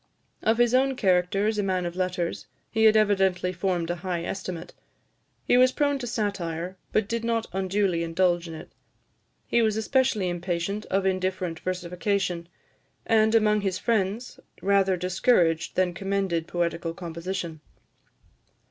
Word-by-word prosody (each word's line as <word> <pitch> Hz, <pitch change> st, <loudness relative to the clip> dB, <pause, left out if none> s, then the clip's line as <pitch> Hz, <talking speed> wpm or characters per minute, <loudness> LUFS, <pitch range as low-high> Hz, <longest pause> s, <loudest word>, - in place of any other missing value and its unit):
Of 220 Hz, +1 st, +2 dB
his 240 Hz, 0 st, +3 dB
own 265 Hz, +1 st, +3 dB
character 190 Hz, -2 st, +2 dB
as 215 Hz, 0 st, 0 dB
a -, -, +1 dB
man 185 Hz, -2 st, 0 dB
of 175 Hz, 0 st, -4 dB
letters, 180 Hz, -2 st, -2 dB, 0.2 s
he 220 Hz, 0 st, +3 dB
had 220 Hz, 0 st, +7 dB
evidently 190 Hz, -3 st, +2 dB
formed 175 Hz, -2 st, -1 dB
a 175 Hz, -, -3 dB
high 175 Hz, 0 st, -3 dB
estimate. 175 Hz, -2 st, -5 dB, 0.7 s
He 245 Hz, -, +4 dB
was 255 Hz, 0 st, +6 dB
prone 285 Hz, 0 st, +1 dB
to 245 Hz, -, -4 dB
satire, 185 Hz, -6 st, -3 dB, 0.2 s
but 215 Hz, -2 st, +1 dB
did 230 Hz, +1 st, -2 dB
not 230 Hz, -1 st, 0 dB
unduly 190 Hz, -2 st, 0 dB
indulge 175 Hz, +1 st, +1 dB
in 165 Hz, -, -7 dB
it. 155 Hz, -, -10 dB, 0.7 s
He 235 Hz, -, +2 dB
was 220 Hz, -1 st, +2 dB
especially 220 Hz, -3 st, +1 dB
impatient 175 Hz, +3 st, -2 dB
of 195 Hz, 0 st, 0 dB
indifferent 185 Hz, -3 st, -1 dB
versification; 180 Hz, -1 st, -2 dB, 0.6 s
and, 220 Hz, 0 st, +3 dB
among 210 Hz, -1 st, +3 dB
his 190 Hz, -2 st, -1 dB
friends, 220 Hz, +2 st, -1 dB, 0.2 s
rather 195 Hz, -1 st, +3 dB
discouraged 180 Hz, -2 st, +2 dB
than 185 Hz, -1 st, +2 dB
commended 195 Hz, -3 st, -1 dB
poetical 170 Hz, -1 st, -2 dB
composition. 170 Hz, -1 st, -5 dB
190 Hz, 145 wpm, -26 LUFS, 175-215 Hz, 0.7 s, had